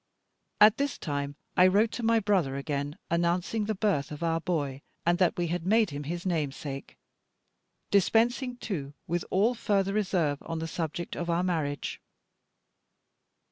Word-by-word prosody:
At 210 0 +7
this 280 -2 -1
time 145 -1 -3 0.2
I 180 - +7
wrote 210 +4 +3
to 245 - -4
my 230 0 +3
brother 190 -10 +1
again, 140 +1 -3
announcing 175 +5 +1
the 215 0 -1
birth 190 -9 0
of 150 +2 -6
our 165 0 +1
boy, 145 -6 -2 0.2
and 175 +1 +3
that 180 -3 +3
we 175 - +1
had 175 0 -2
made 215 0 +3
him 145 0 -5
his 175 +4 -4
namesake; 145 -4 -3 0.9
dispensing, 240 +6 +2
too, 145 - -5
with 170 0 -1
all 210 +6 +3
further 200 -4 0
reserve 175 -8 +1
on 165 - -5
the 160 0 -3
subject 165 +1 -4
of 170 0 -3
our 170 +1 +2
marriage. 155 -6 -2
175 Hz, 155 wpm, -29 LUFS, 150-205 Hz, 0.9 s, At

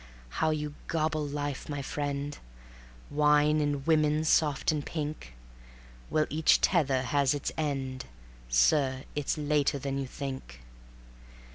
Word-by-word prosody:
How 160 - +3
you 150 -1 -2
gobble 155 -2 0
life, 145 -1 -4
my 145 -1 -3
friend; 145 0 -3 0.8
Wine, 150 +1 +4
and 145 -2 -1
woman 155 -1 +3
soft 150 -2 +2
and 150 -2 -2
pink! 150 - -5 0.7
Well, 155 0 +2
each 155 +1 +4
tether 140 -8 +2
has 140 +2 +2
its 145 - -3
end: 135 -4 -3 0.4
Sir, 130 - +3
it's 145 +1 -1
later 145 -1 +1
than 140 0 -3
you 135 - -3
think. 130 - -7
145 Hz, 125 wpm, -29 LUFS, 140-150 Hz, 0.8 s, Wine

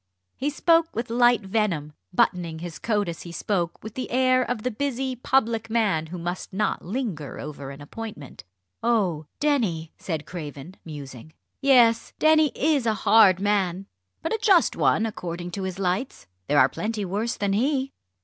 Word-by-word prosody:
He 285 - -1
spoke 330 +2 +2
with 230 +1 -3
light 240 -1 +4
venom, 190 -7 -1 0.2
buttoning 175 -2 +1
his 170 -1 -7
coat 210 -4 0
as 170 -1 -5
he 170 - -8
spoke 175 -1 -2
with 220 0 -7
the 255 - -4
air 255 0 +3
of 240 -3 -2
the 250 - 0
busy 260 +1 -2
public 230 -3 +1
man 205 -9 +1
who 180 +3 -7
must 175 +2 -5
not 210 +3 -1
linger 185 - -4
over 140 -2 -7
an 140 +1 -10
appointment. 180 - -8 0.4
"Oh! 190 -10 +1
Denny!" 215 - 0
said 160 -4 -4
Craven, 155 -1 -8
musing; 145 -2 -9 0.3
"yes, 245 -5 +4
Denny 310 -1 +4
is 285 -4 +1
a 220 - +2
hard 205 -3 +6
man, 195 -2 0 0.4
but 325 - -1
a 445 - -1
just 390 -4 +4
one 225 - +2
according 175 -5 -5
to 195 - -4
his 185 -1 -4
lights. 195 +7 -2 0.2
There 145 - +2
are 130 - +7
plenty 210 - -3
worse 210 +6 -2
than 200 -1 0
he." 265 +4 0
210 Hz, 170 wpm, -25 LUFS, 170-245 Hz, 0.4 s, are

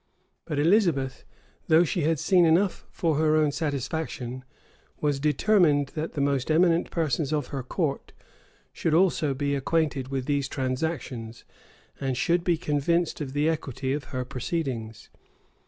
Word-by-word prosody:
[*] - - -48
But 150 - -3
Elizabeth, 155 - +2 0.4
though 160 +2 +6
she 175 +1 -1
had 160 +1 +1
seen 180 +5 +4
enough 175 +4 +2
for 160 -4 0
her 155 0 +3
own 155 -2 +3
satisfaction, 140 -3 -3 0.6
was 145 -2 0
determined 150 -1 +3
that 155 +1 -5
the 145 - -2
most 140 -1 0
eminent 170 +1 +3
persons 155 -3 -1
of 150 -4 -1
her 135 - -3
court 140 +3 -3 0.6
should 160 - 0
also 165 -5 +2
be 140 +1 -1
acquainted 140 -1 0
with 135 -1 -3
these 140 -1 0
transactions, 130 -4 -4 0.5
and 135 -2 -2
should 170 +7 +1
be 175 -2 +2
convinced 160 +2 0
of 135 -3 -5
the 145 +2 +1
equity 135 -4 -2
of 145 -2 -3
her 130 0 -4
proceedings. 125 -5 -4
145 Hz, 150 wpm, -26 LUFS, 135-165 Hz, 0.6 s, though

